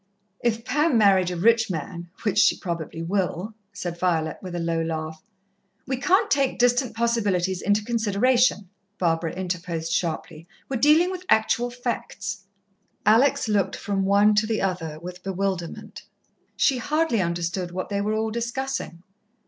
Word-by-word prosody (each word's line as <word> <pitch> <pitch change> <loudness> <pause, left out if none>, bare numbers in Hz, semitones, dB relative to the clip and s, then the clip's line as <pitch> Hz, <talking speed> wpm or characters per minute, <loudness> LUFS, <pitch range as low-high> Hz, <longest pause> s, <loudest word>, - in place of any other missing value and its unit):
"If 230 -1 0
Pam 295 0 +2
married 195 -4 +4
a 180 - -3
rich 225 +5 +3
man 170 +1 -5
which 205 - +1
she - - +5
probably 165 -2 -5
will," 190 +3 -2 0.2
said 175 -4 -5
Violet, 165 -3 0
with 185 -2 -7
a - - -2
low 165 -1 -1
laugh. 160 -1 -4 0.6
"We 260 0 -2
can't 370 +9 +2
take 275 -2 +2
distant 245 0 +2
possibilities 205 -6 0
into 205 +1 +1
consideration," 230 0 +2 0.3
Barbara 165 -2 0
interposed 175 -3 -3
sharply. 165 -1 -3 0.2
"We're 270 - -2
dealing 310 +7 +5
with 370 0 -7
actual 230 +2 +3
facts." 240 -4 -5 0.6
Alex 225 +4 +4
looked 205 -3 +1
from 195 -1 -2
one 200 +2 +4
to 210 +1 +2
the 220 -1 0
other 165 -5 -2
with 180 +2 -9
bewilderment. 190 -2 -4 0.6
She 265 -3 +3
hardly 300 -4 +1
understood 175 +1 -2
what 185 +1 -5
they 200 -1 -1
were 210 +1 0
all 220 0 -1
discussing. 235 -6 -4
200 Hz, 150 wpm, -24 LUFS, 175-235 Hz, 0.6 s, she